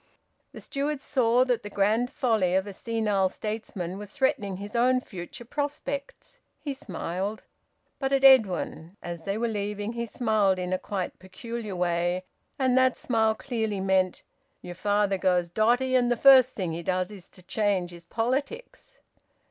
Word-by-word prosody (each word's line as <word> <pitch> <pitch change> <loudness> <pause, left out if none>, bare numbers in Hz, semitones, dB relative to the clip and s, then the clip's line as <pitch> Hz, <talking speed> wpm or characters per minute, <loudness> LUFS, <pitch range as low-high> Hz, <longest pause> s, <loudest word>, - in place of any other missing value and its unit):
The - - -10
steward 285 +1 -2
saw 250 -2 +2
that 245 -2 0
the 205 - -7
grand 215 +5 +1
folly 220 -11 +1
of 190 +1 +2
a 200 - -7
senile 210 -3 0
statesman 195 -3 -5
was 205 -1 -8
threatening 210 -7 0
his 205 +3 -8
own 255 +2 +4
future 190 0 -9
prospects. 285 - -5 0.2
He 285 - -4
smiled. 195 -3 -4 0.6
But 270 -1 -1
at 275 0 +2
Edwin, 200 -8 +4
as 170 -1 -6
they 200 +1 -1
were 235 +1 0
leaving, 210 0 -3
he 235 0 -3
smiled 215 -5 +1
in 180 0 -2
a 185 - 0
quite 190 -3 -4
peculiar 210 +2 -6
way, 175 +1 0 0.3
and 260 -2 +2
that 260 -1 +3
smile 220 -2 +1
clearly 220 -5 -2
meant: 190 -1 +1 0.4
"Your 175 - -7
father 205 +1 +1
goes 180 -2 +2
dotty, 245 +7 +2
and 245 -1 +3
the 240 - +2
first 260 0 +7
thing 185 -5 -2
he 170 - -4
does 185 +2 -1
is 195 -4 -11
to 185 - -15
change 190 -2 0
his 170 -1 -13
politics." 285 - -3
210 Hz, 165 wpm, -27 LUFS, 185-245 Hz, 0.6 s, first